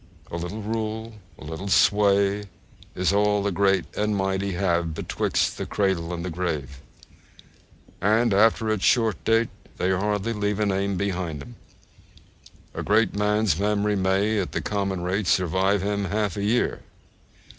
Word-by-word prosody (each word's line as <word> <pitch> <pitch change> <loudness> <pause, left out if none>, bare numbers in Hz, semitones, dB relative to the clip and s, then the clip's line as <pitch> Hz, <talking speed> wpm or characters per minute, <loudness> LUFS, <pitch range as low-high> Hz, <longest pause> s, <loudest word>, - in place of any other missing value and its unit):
A - - -4
little 90 +6 -5
rule, 110 +1 -3 0.2
a - - -12
little 80 +6 -6
sway, 100 0 +3 0.5
Is 90 +1 +1
all 105 0 +2
the 100 - 0
great 95 0 +2
and 105 0 0
mighty 95 0 -1
have 85 -3 0
Betwixt - - -1
the - - -3
cradle 95 -4 0
and 85 -1 -4
the 90 - -3
grave 75 -6 -4 1.2
and, 110 +2 +3
after 110 +2 +3
its 110 -3 -1
short 115 -7 +2
date, 115 0 +2 0.3
they 90 - +1
hardly 105 +3 0
leave 105 -1 -1
a 105 - +2
name 100 -1 0
behind 90 -6 -2
them. 120 +11 -11 1.2
'A - - -4
great 110 +3 +2
man's 105 -4 +1
memory 105 0 +1
may, 100 +3 +1
at 95 - -3
the - - -1
common 100 -3 -2
rate, 95 +3 -1
survive 95 +3 +2
him 100 0 -1
half 100 -1 -1
a 100 - -3
year.' 115 +4 +1
100 Hz, 155 wpm, -24 LUFS, 95-105 Hz, 1.2 s, sway